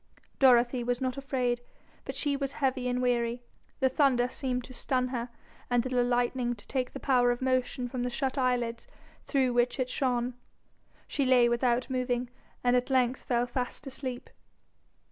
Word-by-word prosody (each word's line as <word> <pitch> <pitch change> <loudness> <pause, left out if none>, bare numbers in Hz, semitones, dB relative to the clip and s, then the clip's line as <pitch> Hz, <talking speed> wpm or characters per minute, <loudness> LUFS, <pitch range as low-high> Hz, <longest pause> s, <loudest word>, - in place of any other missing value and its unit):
Dorothy 245 -1 +5
was 245 0 0
not 255 -1 -1
afraid, 255 -3 -1 0.4
but - - -5
she 290 -1 0
was 275 -1 -2
heavy 260 -2 0
and 250 0 0
weary; 240 0 0 0.4
the 265 - +5
thunder 260 -3 +3
seemed 250 -2 -2
to 255 - -11
stun 255 0 0
her 245 -1 -3 0.4
and 245 -1 +2
the 255 -1 +1
lightning 245 0 0
to 205 - -16
take 260 -2 -2
the - - -6
power 250 -3 +3
of 245 0 0
motion 255 -1 0
from 245 0 -4
the 250 - 0
shut 265 +1 -2
eyelids 245 -3 0 0.4
through 260 -3 +2
which 245 +2 +1
it 255 -1 0
shone. 250 -2 0 0.7
She 280 - -1
lay 255 -2 +5
without 240 +1 +1
moving, 250 -1 -1 0.3
and 245 0 +4
at 250 +1 +1
length 255 -1 +2
fell 240 -1 +1
fast 245 +2 -4
asleep. 260 -2 -5
250 Hz, 170 wpm, -29 LUFS, 245-260 Hz, 0.7 s, Dorothy